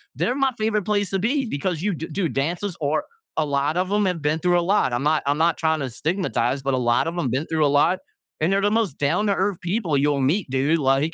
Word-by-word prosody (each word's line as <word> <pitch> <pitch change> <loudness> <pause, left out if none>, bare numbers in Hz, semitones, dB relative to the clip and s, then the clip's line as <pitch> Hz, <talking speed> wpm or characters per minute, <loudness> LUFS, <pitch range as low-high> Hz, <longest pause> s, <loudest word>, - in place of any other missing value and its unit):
they're 245 - 0
my 270 -1 +2
favorite 215 -1 0
place 205 -2 0
to 195 - 0
be. 265 +7 0
Because 170 - -2
you 205 +2 0
d 165 0 -5
dude, 170 -5 -1
dancers 170 - -2
are 150 +1 0 0.3
a 155 - +2
lot 145 +2 0
of 185 +1 0
'em 205 0 +2
have 180 -4 -1
been 150 +2 0
through 175 0 +2
a - - +1
lot. 185 -5 +2
I'm 120 +2 -1
not 155 +1 +2
I'm 145 +1 +1
not 165 +1 +2
tryna 160 -5 0
stigmatize, 140 - -1
but 135 0 0
a - - +1
lot 120 +3 +2
of 170 +2 -4
'em 145 -7 0
been 130 +6 -1
through 160 -2 +1
a - - +4
lot. 145 +6 +3 0.4
And 170 +5 +2
they're 195 - +2
the 205 +1 +2
most 220 -9 0
down-to-earth 195 +5 0
people 175 -4 0
you'll 140 0 +1
meet, 155 +6 +1
dude. 135 +5 +1
Like 140 +3 +1
165 Hz, 250 wpm, -23 LUFS, 140-195 Hz, 0.4 s, a